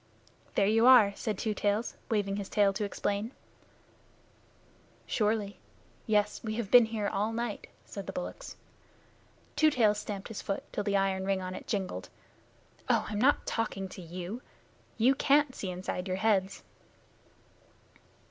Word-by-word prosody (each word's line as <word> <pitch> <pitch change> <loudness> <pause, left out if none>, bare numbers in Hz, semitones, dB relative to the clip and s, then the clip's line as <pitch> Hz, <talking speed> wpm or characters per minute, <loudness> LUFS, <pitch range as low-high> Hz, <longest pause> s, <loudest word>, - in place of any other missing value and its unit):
"There 200 - +4
you 225 +4 +4
are!" 230 -6 +8
said 215 -3 -3
Two 215 +1 -1
Tails, 205 +3 -1
waving 205 -3 0
his 200 -2 -5
tail 200 -2 +3
to 210 +2 -2
explain. 205 +3 -2 1.7
"Surely. 210 -2 -1 0.5
Yes, 210 -1 +1
we 215 -1 -3
have 225 -3 -4
been 245 -2 +9
here 220 -2 -2
all 210 +2 -1
night," 230 -2 -4 0.2
said 200 -2 -8
the - - -3
bullocks. 275 - -6 1.0
Two 310 - +5
Tails 215 -7 +3
stamped 205 -1 -6
his 225 - -6
foot 195 - -3
till 205 - -1
the 200 -1 +1
iron 195 -1 0
ring 195 0 0
on 185 0 -5
it - - -8
jingled. 185 - -3 0.8
"Oh, - - +3
I'm 210 -1 -2
not 280 +3 +3
talking 210 -4 -2
to 185 - -9
you. 180 +7 -6 0.6
You 240 +4 +5
can't 285 0 +3
see 195 - -5
inside 180 +1 -4
your 185 0 -1
heads." 195 -2 +1
210 Hz, 150 wpm, -30 LUFS, 195-225 Hz, 1.7 s, been